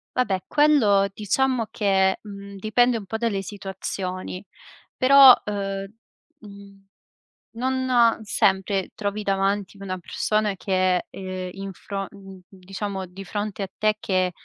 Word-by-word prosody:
Vabbè, 195 -7 0
quello 240 -10 +4
diciamo 240 +4 0
che, 190 -2 +2
mhmm, 200 -1 -10
dipende 230 +4 +2
un 200 - -9
po' 220 - -3
dalle 220 -4 -1
situazioni. 190 -1 -5 0.5
Però, 270 0 +8
uhm, 195 -1 -3 0.5
mhmm, 200 -3 -14 0.7
non 255 -2 +2
sempre 195 -1 +1
trovi 210 -1 -3
davanti 195 +1 -1
una 185 -1 -4
persona 210 +3 -1
che, 185 -1 0
ehm, 185 -1 -6
in 195 +1 -7
fro 195 +1 -5
mhmm, 195 -2 -13
diciamo 195 +1 -6
di 185 +2 -11
fronte 205 +1 -4
a - - -3
te 215 0 +1
che, 185 -1 0
200 Hz, 125 wpm, -24 LUFS, 190-215 Hz, 0.7 s, Però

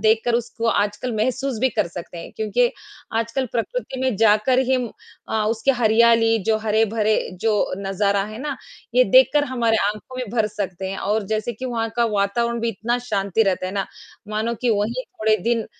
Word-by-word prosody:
देखकर 225 +2 +2
उसको 230 -1 -2
आजकल 210 +4 0
महसूस 255 +2 -1
भी 260 - +4
कर 200 - 0
सकते 170 0 -8
हैं। - - -8
क्योंकि 230 +3 +1 0.5
आजकल 230 +3 -1
प्रकृति 260 - -3
में 260 -4 0
जाकर 220 +4 +4
ही 265 - +4 0.5
अ, 220 -1 0
उसकी 230 +4 +1
हरियाली, 230 -1 +4
जो 220 +1 +2
हरे-भरे 220 0 +1 0.2
जो 225 -1 +2 0.3
नज़ारा 200 0 0
है 215 +1 -8
ना, 290 -2 -3 0.4
ये - - +6
देखकर - - +5
हमारे 235 -4 +1
आँखों 215 +5 -5
में 255 - -2
भर 215 -1 +3
सकते 190 -2 -4
हैं, 195 - -5
और 210 +2 0
जैसे 220 +3 -2
कि 260 - -8
वहाँ 230 -2 -2
का 235 - +3
वातावरण 235 +4 0
भी 230 - 0
इतना 230 +3 -1
शांति 200 +2 +1
रहता 185 -2 0
है 185 - -5
ना, 195 -1 -2 0.4
मानो 215 +2 -1
कि 245 - +3
वहीं 225 +4 0
थोड़े 220 0 0
दिन 230 -2 +1
225 Hz, 180 wpm, -22 LUFS, 210-240 Hz, 0.5 s, ये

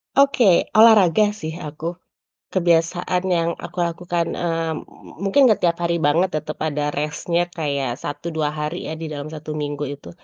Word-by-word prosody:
Oke, 275 -3 +4 0.3
olahraga 210 -2 +6
sih 160 -5 -6
aku, 160 +4 -6 0.5
kebiasaan 175 0 +1
yang 165 0 +1
aku - - -10
lakukan, 170 0 -1
eee, 165 -2 -1 0.5
mungkin 230 +8 +4
nggak 215 -4 +3
tiap 170 -1 +2
hari 170 0 +1
banget 165 +6 +3
tetap 155 0 -4
ada 150 -1 -1
rest-nya 155 +4 -1
kayak 140 -7 -2
1, 145 +3 -6
2 155 -2 0
hari 150 +3 -4
ya, 160 - -5
di 165 - -5
dalam 150 0 -6
1 155 0 -7
minggu 145 -1 -3
itu. 140 +1 -8
165 Hz, 160 wpm, -21 LUFS, 150-175 Hz, 0.5 s, olahraga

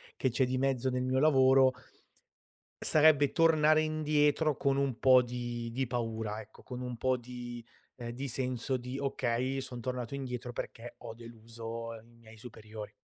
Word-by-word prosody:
che 130 - 0
c'è 125 +2 +2
di 130 +1 -1
mezzo 130 -1 +1
nel 125 0 -1
mio 130 +1 +1
lavoro 130 -3 +5 1.1
sarebbe 150 -2 +5
tornare 155 -2 +4
indietro 155 -1 +2
con 135 0 +1
un 140 -4 0
po' 130 -1 +6
di 120 -1 -4
di 130 +1 -1
paura 110 -3 -3
ecco, - - -16
con 125 -1 -7
un 125 -1 -4
po' 130 +2 +1
di 120 -1 -8 0.3
ehm, 120 -1 -6
di 135 +3 -5
senso 130 0 -2
di: 125 +2 -6
"okay, 130 0 -1
son 125 -2 -7
tornato 125 0 -4
indietro 125 -3 -5
perché 120 0 -7
ho 115 -1 -8
deluso 115 0 -8
i 115 +1 -16
miei 110 -1 -15
superiori". 110 -2 -9
125 Hz, 160 wpm, -31 LUFS, 115-135 Hz, 1.1 s, po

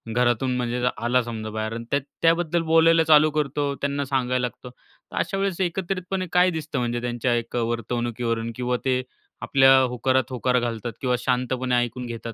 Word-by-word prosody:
घरातून 125 +1 +1
म्हणजे 125 0 -2 0.2
आला 120 +3 +2
समजा 110 -2 -5
बाहेर 110 +1 -3
आणि 115 +1 -6
त्या 140 - +3 0.2
त्याबद्दल 170 0 +2
बोलायला 165 0 +5
चालू 155 -1 +6
करतो, 145 -1 -1
त्यांना 140 0 -2
सांगायला 130 -2 0
लागतो. 125 0 -5
तर 125 - -19
अशा 195 - -1
वेळेस 195 -2 -1
एकत्रितपणे 185 +1 -2
काय 180 +1 +5
दिसतं 155 -4 -4
म्हणजे 120 -1 -2
त्यांच्या 120 0 -1
एक 115 0 -4
वर्तवणुकीवरून 115 0 -2
किंवा 125 +1 -1
ते 130 -1 +2 0.4
आपल्या 135 -1 +5
होकारात 130 +1 +1
होकार 125 0 +1
घालतात 120 -1 -3
किंवा 125 -2 +1
शांतपणे 125 0 0
ऐकून 120 +1 -1
घेतात 115 -1 -6
125 Hz, 165 wpm, -24 LUFS, 120-150 Hz, 0.4 s, चालू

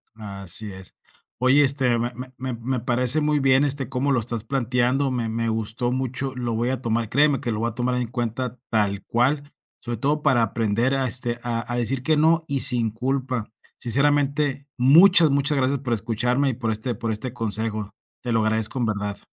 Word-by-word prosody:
Así 100 -1 -7
es. 95 -1 -12 0.5
Oye, 130 +3 +5
este 130 -4 +2
me 120 +1 -2
me 125 +1 -9
me 130 0 -4
me 125 +2 -3
parece 125 +4 +2
muy 150 0 +1
bien, 135 0 +4
este, 140 -2 0
cómo 135 +2 -1
lo 130 - +2
estás 115 -1 -3
planteando. 125 +2 0
Me 120 -3 -2
me 115 +1 -2
gustó 110 +2 -2
mucho. 130 +1 -3
Lo 120 -2 -3
voy 115 +2 0
a 130 -1 -2
tomar, 115 -2 -1
créeme 145 +2 +3
que 120 -4 -3
lo 105 - -2
voy 115 +1 0
a 115 - -11
tomar 125 +1 -1
en 125 -1 -1
cuenta 120 +1 -4
tal 100 -3 0
cual, 135 +5 +1 0.4
sobre 120 -1 -5
todo 145 +5 0
para 125 -5 +3
aprender 115 +4 0
a, 135 -1 0
este, 120 -1 +1
a 120 0 -3
a 120 - -1
decir 125 +2 -1
que 155 +2 +2
no 160 +2 +3
y 140 -3 -1
sin 115 -2 +3
culpa. 125 -1 -3 0.3
Sinceramente, 140 +2 0
muchas, 165 +6 +6
muchas 140 +1 +1
gracias 135 +1 +1
por 125 -3 -2
escucharme 120 +5 0
y - - -1
por 115 -1 -2
este 110 +3 -3
por 110 +2 -3
este 120 +4 -4
consejo. 110 -2 -3 0.3
Te 120 - -2
lo 115 - +2
agradezco 110 +3 -1
en 120 - +1
verdad. 105 -1 -3
125 Hz, 200 wpm, -23 LUFS, 115-135 Hz, 0.5 s, muchas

